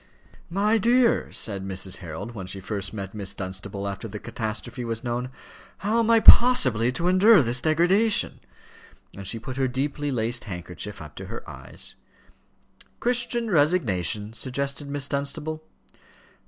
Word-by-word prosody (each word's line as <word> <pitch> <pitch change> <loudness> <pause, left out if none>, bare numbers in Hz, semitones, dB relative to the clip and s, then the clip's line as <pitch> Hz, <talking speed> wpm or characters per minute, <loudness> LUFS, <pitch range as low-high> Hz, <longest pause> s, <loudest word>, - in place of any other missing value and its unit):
"My 210 +5 +2
dear," 240 +2 +3
said 100 -4 -2
Mrs. 95 -1 -1
Harold, 95 +6 -7
when 95 -5 -7
she 95 +1 -4
first 100 0 -4
met 100 -3 -6
Miss 100 -2 -4
Dunstable 95 +1 -5
after 100 +3 -5
the 105 0 -7
catastrophe 110 +4 -5
was 115 -1 -4
known, 120 +1 -3 0.5
"how 215 +4 0
am 230 -1 +1
I 230 -1 +6
possibly 130 - +7
to 170 +7 -1
endure 185 0 +6
this 120 +1 0
degradation?" 180 +8 +3 0.8
And 95 -1 -7
she 115 - -1
put 125 +3 -7
her 135 -1 +1
deeply 140 +3 -2
laced 120 0 -2
handkerchief 90 0 -7
up 75 0 -12
to - - -7
her - - -8
eyes. - - -9 1.1
"Christian 240 -2 0
resignation," 115 - +1
suggested 140 +3 -4
Miss 145 -1 -1
Dunstable. 150 +3 -3
125 Hz, 145 wpm, -25 LUFS, -, 1.1 s, possibly